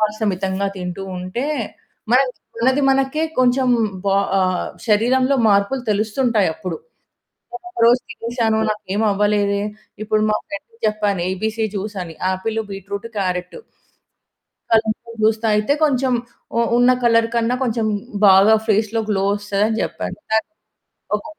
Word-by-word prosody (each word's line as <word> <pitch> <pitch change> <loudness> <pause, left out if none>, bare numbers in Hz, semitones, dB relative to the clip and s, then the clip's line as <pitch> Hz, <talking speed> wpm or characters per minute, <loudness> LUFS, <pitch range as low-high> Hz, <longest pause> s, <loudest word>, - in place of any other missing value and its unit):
మాంసం 215 0 0
మితంగా 190 +1 -2
తింటూ 180 +1 -5
ఉంటే, 185 +9 -4 0.7
మనది, 255 0 +4 0.3
మనది 260 +4 +2
మనకే 270 +3 +1 0.2
కొంచెం 255 +1 +3 0.4
బా 195 0 +3 0.2
ఆహ్, 185 -1 0 0.2
శరీరంలో 255 +6 +3
మార్పులు 200 +6 +2
తెలుస్తుంటాయి 215 0 +1
అప్పుడు. 185 -3 -5 0.8
నేను 360 0 -8
ఒక 360 - -20
రోజు 245 +2 +5
తినేేశాను, 230 -3 -1
నాకేమి 210 0 -2
అవ్వలేదే. 200 0 +1 0.4
ఇప్పుడు 215 0 +1
మా 215 - +2
ఫ్రెండ్‌కి 230 +3 -9
చెప్పాను 210 -3 0
ఏబీసీ 220 +4 -1
జూస్ 205 +1 -4
అని, 165 -2 -10
యాపిలు, 220 +4 -1
బీట్రూటు, 200 +3 -6
క్యారెటు. 180 - -3 1.1
అల్లంతో 220 +1 0
జ్యూస్ 220 0 +3
తాగితే, 210 +3 +2
కొంచెం 260 -3 +1 0.4
ఉ - - +3 0.2
ఉన్న 245 +1 +5
కలర్ 230 -1 +4
కన్నా 235 +1 +1
కొంచెం, 230 -2 0 0.4
బాగా 195 +3 +7
ఫేస్‌లో 220 +1 +1
గ్లో 195 -2 +1
ఒస్తదని 205 +2 -1
జెప్పాను. - - -4
తన్ 220 +6 +2 0.7
ఒక 205 - -10
215 Hz, 130 wpm, -20 LUFS, 200-235 Hz, 1.1 s, బాగా